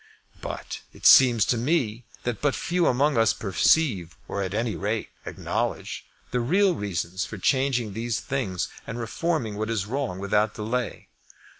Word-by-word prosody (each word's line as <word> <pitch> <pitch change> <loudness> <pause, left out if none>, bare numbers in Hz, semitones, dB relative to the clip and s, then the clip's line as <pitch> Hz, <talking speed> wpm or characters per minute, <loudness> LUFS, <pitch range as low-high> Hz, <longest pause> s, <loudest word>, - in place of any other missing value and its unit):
But - - -6
it - - -12
seems 120 -5 +8
to 120 - +1
me 120 -4 0 0.2
that 120 -3 -3
but 145 -2 +2
few 175 -1 +1
among 135 0 +3
us 115 - +4
perceive, 95 - +1
or 100 - -3
at 95 0 -3
any 115 0 -1
rate 105 +2 -2 0.2
acknowledge, - - -3 0.2
the 125 - +1
real 185 +10 +3
reasons 95 - -3
for 105 - -6
changing 125 0 +1
these 115 +1 -2
things 125 -10 -2 0.2
and - - -5
reforming 120 -1 -2
what 110 +1 -2
is 110 -4 -1
wrong 125 -4 -2
without 105 +2 +1
delay. 115 +2 -3
115 Hz, 155 wpm, -25 LUFS, 105-135 Hz, 0.2 s, seems